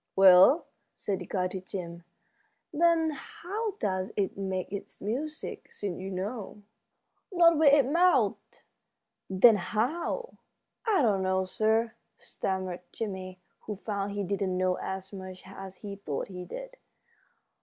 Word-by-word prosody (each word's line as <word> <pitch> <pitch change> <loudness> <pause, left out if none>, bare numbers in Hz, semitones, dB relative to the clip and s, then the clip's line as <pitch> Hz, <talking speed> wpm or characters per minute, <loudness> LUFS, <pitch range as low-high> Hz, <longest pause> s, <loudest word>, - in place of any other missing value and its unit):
"Well," 190 - +8 0.3
said 195 -2 -2
the - - -8
guide 185 -2 -1
to 190 - -5
Jim, 175 -2 -6 0.7
"then 325 0 +3
how 425 +7 -5
does 190 - -2
it 195 -2 0
make 190 -1 -3
its 200 - -7
music, 290 +9 -4
since 195 -4 -5
you 190 +1 -5
know?" 205 +2 -5 0.7
"Not 335 -3 +5
with 300 -3 +7
its 280 -3 +5
mouth." 350 +5 +4 0.9
"Then 210 +4 +7
how?" 260 - -2 0.5
"I 395 -9 +4
don't 205 -5 +3
know, 190 0 +1
sir," 220 +3 +1 0.2
stammered 185 -2 -3
Jimmie, 190 -4 -5 0.3
who 210 - -3
found 200 0 -3
he 205 0 -2
didn't 195 -1 -1
know 185 0 +2
as 190 +1 -5
much 185 -1 -8
as 190 0 -9
he 200 -1 -6
thought 155 -6 -4
he 180 -1 -7
did. - - -8
200 Hz, 135 wpm, -29 LUFS, 185-280 Hz, 0.9 s, Well